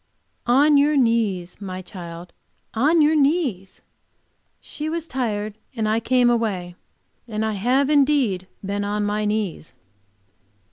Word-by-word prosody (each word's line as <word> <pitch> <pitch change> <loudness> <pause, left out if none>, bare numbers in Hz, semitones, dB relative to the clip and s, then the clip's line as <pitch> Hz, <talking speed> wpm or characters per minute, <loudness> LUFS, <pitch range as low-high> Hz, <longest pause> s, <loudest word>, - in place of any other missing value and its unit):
"On 285 +4 +5
your 295 +1 +3
knees, 210 -8 0
my 185 -1 -6
child, 175 -2 -9 0.4
on 300 +8 +3
your 305 +2 +3
knees!" 275 - 0 0.8
She 305 +1 -5
was 330 0 -3
tired, 215 -5 -3 0.2
and 220 -2 -1
I 220 +1 +2
came 250 +1 +2
away; 210 -7 0 0.5
and 220 -1 -2
I 220 - 0
have 250 +7 +1
indeed 275 -10 +2 0.2
been 200 +1 -2
on 205 +1 -1
my 210 +1 -1
knees. 210 -7 -3
220 Hz, 130 wpm, -22 LUFS, 200-275 Hz, 0.8 s, On